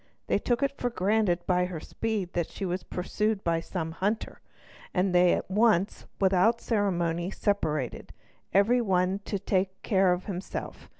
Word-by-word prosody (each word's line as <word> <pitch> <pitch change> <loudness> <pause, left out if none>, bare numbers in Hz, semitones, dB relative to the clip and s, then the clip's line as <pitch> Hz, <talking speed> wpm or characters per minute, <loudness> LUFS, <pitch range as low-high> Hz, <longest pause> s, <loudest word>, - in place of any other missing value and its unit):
They - - +1
took 240 +2 0
it 275 - +2
for 245 - -1
granted 195 -4 +1
by 180 -1 +2
her 180 -3 -5
speed 210 0 -3
that 170 -2 -1
she 195 - -5
was 180 0 -2
pursued 210 +3 -2
by 165 -1 +1
some 165 -1 -4
hunter, 205 +6 -2 0.5
and 185 0 +2
they 180 0 +5
at - - -3
once 210 -2 +2
without 195 +4 +3
ceremony 175 -5 0
separated, 155 - -1 0.4
every 220 +6 +4
one 190 -2 +1
to 200 - -2
take 190 -1 -1
care 190 -4 +3
of 180 +1 -1
himself. 190 -2 -6
190 Hz, 160 wpm, -28 LUFS, 180-210 Hz, 0.5 s, they